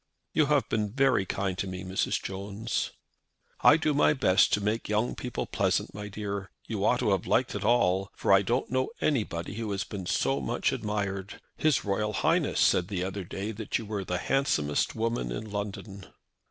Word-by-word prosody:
"You 155 - +3
have 140 -5 +2
been 105 -2 -1
very 130 -8 +3
kind 95 -1 -1
to 100 - -1
me, 90 0 -5
Mrs. 95 0 0
Jones." 100 +4 -3 0.7
"I 150 - +7
do 155 -2 +1
my 150 +1 +4
best 95 -9 +4
to - - +4
make 105 +2 -1
young 105 +3 +1
people 125 -2 -4
pleasant, - - 0
my 105 0 -6
dear. 100 -1 -4 0.2
You - - -3
ought - - +3
to - - +2
have - - 0
liked - - +2
it 105 - -3
all, 95 -4 +3
for - - +2
I 95 - +7
don't 120 +6 -1
know 130 0 +1
anybody 105 - -1
who 110 -2 -3
has 100 0 -1
been 95 -4 -6
so 70 +1 +1
much 65 - 0
admired. 100 -2 -3 0.2
His 155 -8 +2
Royal 105 +2 0
Highness 95 - +1
said 90 - +4
the 95 -3 -2
other 95 -1 -4
night 100 +2 -4
that 110 - -1
you 115 - -6
were 105 -2 -3
the 90 -1 -2
handsomest 80 - +1
woman 115 - -1
in 105 - -5
London." 100 -1 -5
105 Hz, 195 wpm, -28 LUFS, 95-115 Hz, 0.7 s, I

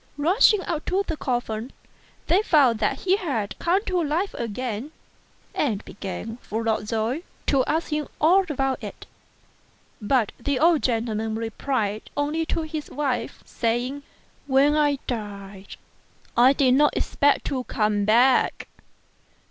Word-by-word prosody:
Rushing 375 +6 +4
up 320 -3 -3
to 385 +2 +1
the 325 - -3
coffin, 240 -3 -3 0.5
they 355 +5 +3
found 275 - +4
that 270 - 0
he 380 +1 +2
had 265 - -2
come 370 +5 +1
to 365 -3 0
life 325 +7 -1
again; 235 +3 -4 0.6
and 220 -8 -1
began, 205 +4 -6
full 225 -1 -4
of 215 -1 -1
joy, 225 +7 -1 0.2
to 270 -2 +3
ask 320 +1 -1
him 300 -1 -1
all 360 +6 +5
about 270 -2 -1
it. - - -8 1.0
But 225 0 +1
the 275 +3 -1
old 325 +2 +4
gentleman 225 -2 -1
replied 225 -1 -2 0.2
only 305 +3 -1
to 325 - -1
his 310 -1 -5
wife, 255 -5 -3
saying, 245 +5 -2 0.2
" - - -35
When 290 +2 +5
I 295 -2 +2
died 200 -4 -6 0.6
I 250 +3 +6
did 265 -2 +3
not 295 +2 +3
expect 285 0 +1
to 260 -2 -2
come 210 -2 0
back. 240 +5 +3
265 Hz, 140 wpm, -24 LUFS, 225-300 Hz, 1.0 s, I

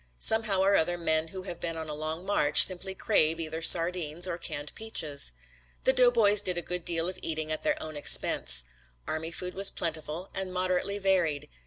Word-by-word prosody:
Somehow 215 - +3
or 200 +1 +2
other 175 +1 0
men 160 -1 -2
who 185 +3 -10
have 175 -3 -9
been 165 -1 -6
on 160 -1 -7
a 150 - -7
long 155 +4 -6
march 155 -7 +7
simply 190 +1 0
crave 165 -6 +1
either 160 0 -6
sardines 170 0 +3
or 175 -1 -6
canned 150 -3 -7
peaches. 155 - -3 0.5
The 260 - +2
doughboys 235 -5 +3
did 180 -3 +1
a 175 - -3
good 180 -1 -5
deal 165 0 -1
of 185 - -7
eating 155 -1 -5
at 155 - -4
their - - -2
own 155 -1 -9
expense. - - +4 0.4
Army 160 +1 -5
food 180 +2 -7
was 195 +1 +3
plentiful 160 +2 -5
and 190 -1 -4
moderately 185 +2 -3
varied. 180 -7 -1
170 Hz, 190 wpm, -27 LUFS, 155-190 Hz, 0.5 s, march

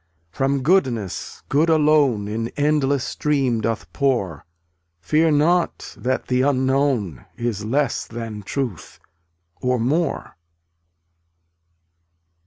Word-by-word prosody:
From 135 +4 0
Goodness 125 - 0
Good 155 +4 +2
alone 150 -9 +3
In 115 +2 -2
endless 145 -2 +2
stream 135 -7 0
doth 105 -7 -3
pour; 95 - -1 0.5
Fear 155 - +2
not 170 +4 +1
that 125 +6 -2
the 125 0 +1
Unknown 130 - +1
Is 115 -3 -2
less 135 +3 0
than 115 -2 -6
truth, 120 - -5 0.6
or 125 -1 +1
more. 140 - -1
130 Hz, 95 wpm, -22 LUFS, 115-145 Hz, 0.6 s, alone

